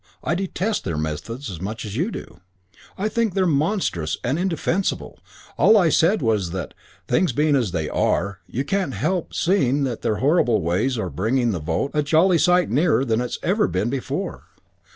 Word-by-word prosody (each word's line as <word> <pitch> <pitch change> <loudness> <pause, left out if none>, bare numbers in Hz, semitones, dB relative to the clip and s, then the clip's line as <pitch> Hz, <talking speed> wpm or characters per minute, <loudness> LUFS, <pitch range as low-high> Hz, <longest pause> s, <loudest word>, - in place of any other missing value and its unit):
I 155 - 0
detest 195 +3 -2
their 85 -4 -3
methods 80 - -4
as 85 -2 -8
much 110 +4 -5
as 105 -1 -6
you 170 - 0
do. - - -9 0.6
I 200 - 0
think 225 -3 -1
they're 190 -1 +2
monstrous 145 - 0
and 135 +7 0
indefensible. 185 +1 -1 0.4
All 220 - +6
I 175 -5 +4
said 170 +2 +3
was 105 -6 +1
that, 90 +1 -5 0.3
things 180 -9 +2
being 150 +2 +2
as 120 -7 +1
they 80 -3 -2
are, 100 +4 0
you 130 - -3
can't 195 +3 -1
help 185 -2 -1
seeing 145 -7 +2
that 125 -4 -3
their 110 - 0
horrible 125 - +2
ways 105 +10 0
are 95 -6 -3
bringing 115 - +1
the 90 - -2
vote 80 - -2
a 150 - +2
jolly 165 +4 +3
sight 180 +1 +3
nearer 145 +1 +2
than 115 -1 +1
it's 125 - -3
ever 210 +4 +2
been 100 +6 -1
before. 135 -2 -4
135 Hz, 185 wpm, -22 LUFS, 105-180 Hz, 0.6 s, All